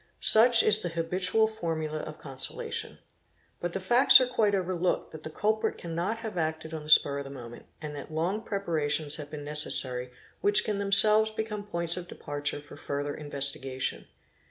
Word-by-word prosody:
Such 230 +1 +5
is 215 0 +4
the 175 - -3
habitual 180 +6 0
formula 160 -7 -4
of 155 - -8
consolation. 135 -2 -4 0.6
But 175 0 -4
the 195 - -2
facts 240 +8 +7
are 255 - +2
quite 220 -5 +1
overlooked 185 -1 -2
that 160 - -10
the 155 - -7
culprit 215 +7 -1
cannot 170 +6 -3
have 210 -5 -4
acted 160 0 -3
on 160 - -5
the 150 - -9
spur 140 -2 +5
of - - -5
the 135 - -10
moment 120 -4 -11 0.2
and 150 -1 -6
that 145 +2 -9
long 175 +7 -2
_ - - -20
preparations 155 -8 -1
have 145 -2 -8
been 150 -1 -8
necessary 130 -4 0 0.3
which 205 0 +4
can 210 -2 -2
themselves 210 +2 +5
become 215 -1 -5
points 170 -3 -3
of 180 -1 -7
departure 145 -3 -4
for 145 - -14
further 145 0 -4
investigation. 140 -3 -2
165 Hz, 180 wpm, -28 LUFS, 145-205 Hz, 0.6 s, facts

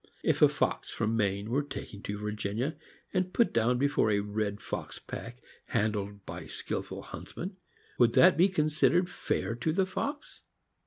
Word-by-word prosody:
If - - +2
a - - +10
fox - - -1
from 110 +1 0
Maine 100 0 0
were 140 +4 +3
taken 110 -7 -7
to 105 - -4
Virginia, 105 +6 -2 0.4
and 185 -1 +1
put 235 - +3
down 115 +2 +3
be 140 +3 +3
fore 140 - +2
a 100 -1 +3
red 105 0 -2
fox - - -5
pack 120 +2 -8 0.2
handled 105 -3 -1
by - - -7
skilled - - -4
huntsmen, 185 +2 -7 0.4
would 120 -1 +5
that 185 0 +7
be 180 +4 +5
considered 160 +2 +3
fair 145 - -2
to 160 +6 0
the 190 +4 +2
fox 285 +10 -4
120 Hz, 165 wpm, -30 LUFS, 105-165 Hz, 0.4 s, a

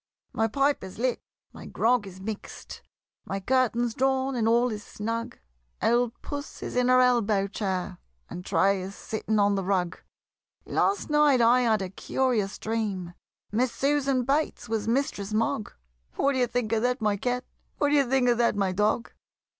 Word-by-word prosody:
My 225 - +1
pipe 275 +5 +1
is 190 -1 -9
lit, 250 +2 -1 0.3
my - - -10
grog 235 -3 +1
is 190 -1 -11
mix'd, 210 +2 -7 0.4
My 195 - -4
curtains 240 +1 +1
drawn 265 +1 +1
and 225 -2 +1
all 240 +2 +3
is 210 -1 -5
snug; 230 +3 -4 0.4
Old 240 0 +1
Puss 285 0 -6
is - - -5
in 250 0 +2
her 255 0 +5
elbow 225 -5 +3
chair, 190 -3 -3 0.3
And 180 +1 -7
Tray 195 +1 +2
is 190 +2 -7
sitting 220 0 -2
on 205 0 +3
the 195 -1 -1
rug. 180 -2 -1 0.6
Last 395 -5 0
night 295 -3 +4
I 240 +2 +5
had 220 -4 +2
a 185 - -4
curious 220 -3 -1
dream, 205 -6 -3 0.4
Miss 240 +4 +1
Susan 275 +1 +1
Bates 285 +5 -1
was 220 -1 -2
Mistress 225 -5 -1
Mogg 220 -1 0 0.4
What 280 - +2
d'ye 255 -2 +2
think 245 -2 -2
of 225 -1 +2
that, 250 +2 +1
my 210 -2 +1
Cat? 245 +4 -2 0.3
What 290 - +2
d'ye 290 -1 +4
think 260 0 +1
of 240 -1 +3
that, 235 -3 +3
my 195 -2 +1
Dog? 210 +4 0
230 Hz, 170 wpm, -27 LUFS, 205-255 Hz, 0.6 s, her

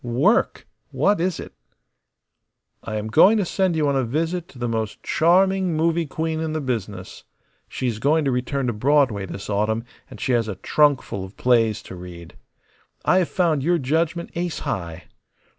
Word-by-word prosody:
"Work! 130 - +1 0.2
What 205 -4 +1
is 180 -1 -1
it?" - - -9 1.3
"I 110 - -5
am 105 0 -3
going 165 - +5
to 205 - +1
send 185 -1 0
you 155 -2 +1
on 140 - +1
a 135 - +1
visit 165 +8 -2
to 140 - -16
the 120 0 -2
most 110 -2 -3
charming 185 +1 +2
movie 165 +1 +1
queen 160 +2 -3
in 160 -1 -2
the 155 - -1
business. 105 -8 -5 0.5
She - - -4
is 115 -3 -1
going 150 +5 +2
to 135 - +1
return 130 +2 -1
to 120 - 0
Broadway 125 -4 +2
this 100 - -7
autumn, 110 +2 0 0.3
and - - -11
she - - -1
has 115 -2 +2
a 105 - -4
trunkful 140 -3 +1
of 95 +2 -11
plays 115 -3 +2
to - - -9
read. 90 -2 -11 0.7
I 185 - +4
have 180 - 0
found 165 -6 +1
your 175 +5 +2
judgment 165 +4 -1
ace 175 -1 -3
high. 85 -2 -4
140 Hz, 180 wpm, -22 LUFS, 110-165 Hz, 1.3 s, going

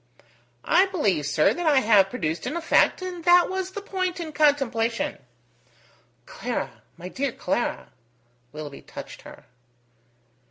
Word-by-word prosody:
"I 375 +3 +4
believe, 200 - 0
sir, 150 +1 +3
that 350 -1 -3
I 285 -4 +5
have 205 -5 +4
produced 165 -8 -3
an 320 - -3
effect, 340 +2 +2
and 360 -2 -6
that 350 +1 +5
was 375 0 -3
the 400 +1 -7
point 370 -3 -2
in 325 -2 -5
contemplation." 265 -7 +1 1.1
"Clara! - - -5 0.2
my 175 - -8
dear 270 +7 -2
Clara!" 240 - -3 0.6
Willoughby 150 -2 -8
touched - - -10
her. - - -14
285 Hz, 130 wpm, -25 LUFS, -, 1.1 s, I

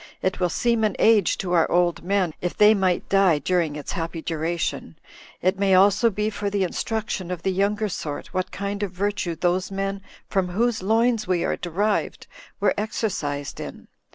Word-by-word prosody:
It 185 +1 0
will 180 -1 +1
seem 235 +5 +1
an 210 -3 +1
age 215 -5 +4
to 180 - -3
our 165 -2 +3
old 175 -1 +2
men, 185 -3 +1
if 180 - -3
they 210 +1 +7
might 190 -4 0
die 195 -5 +4
during 165 0 0
its 150 - -6
happy 165 -2 -4
duration: 165 +1 -3 0.5
it 185 +2 +1
may 195 -1 +4
also 200 +4 +5
be 210 +1 -2
for 205 -1 -3
the 200 -1 0
instruction 200 0 -3
of 180 -2 -5
the 190 - +1
younger 205 +3 0
sort, 150 -6 -5
what 185 -1 -1
kind 200 +1 -4
of 205 - -1
virtue 185 -2 -2
those 180 +3 0
men, 195 0 -3 0.3
from 190 -2 0
whose 220 +4 0
loins 225 +2 +2
we 180 -2 +1
are - - 0
derived, 200 +5 -1 0.3
were - - +3
exercised 170 -10 -3
in. - - -8
190 Hz, 180 wpm, -24 LUFS, 175-205 Hz, 0.5 s, they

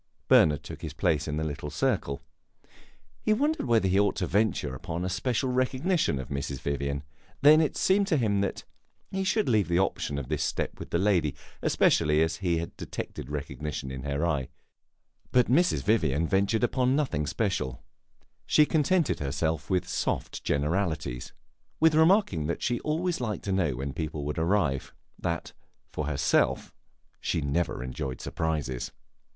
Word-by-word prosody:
Bernard 75 -3 +5
took - - -9
his - - -5
place 75 +1 +1
in 75 0 -2
the 80 - -1
little 75 -1 -4
circle; 70 -1 -1 1.0
he 215 - +2
wondered 295 - 0
whether 115 -5 +3
he 95 +1 +3
ought 100 -1 +2
to 95 - -1
venture 100 - +1
upon 85 +7 -4
a - - -1
special 125 +7 0
recognition 130 - +1
of 65 - -6
Mrs. 70 -1 -3
Vivian. 70 +1 -2 0.4
Then 155 +2 +8
it 155 - 0
seemed 195 +1 +3
to 165 -6 +2
him 105 -6 +1
that 100 - -2 0.5
he 195 0 -1
should 200 +3 +1
leave 110 -5 +3
the 85 0 +1
option 90 -6 0
of 70 -3 -4
this 75 0 -1
step - - -2
with - - -7
the - - +1
lady, 90 -7 +2 0.3
especially 75 +1 +3
as 80 0 -1
he 85 -2 0
had 85 +1 -5
detected 65 - -6
recognition 75 -1 -4
in 65 -1 -5
her 70 +3 -1
eye. 75 -7 0 0.8
But 125 -1 +3
Mrs. 175 +7 +3
Vivian 80 -8 +2
ventured 100 +5 +1
upon 130 +2 +2
nothing 120 - 0
special; 65 -2 -2 0.6
she 150 - +5
contented 160 +2 +2
herself 80 +2 -2
with 90 -2 +1
soft - - -2
generalities 75 -3 -1 0.5
with 160 0 +5
remarking 160 - +4
that 85 - -3
she 120 -1 0
always 165 +1 -1
liked 110 -4 -3
to 100 - -2
know 90 -8 +1
when 70 +2 -4
people 75 -2 -4
would 75 +2 -2
arrive; 80 -5 0 0.2
that, 85 -3 -3 0.4
for 75 - -3
herself, 70 -2 +1 0.5
she - - -1
never 70 -1 -1
enjoyed 65 0 -4
surprises. 75 -6 -2
85 Hz, 165 wpm, -28 LUFS, -, 1.0 s, Then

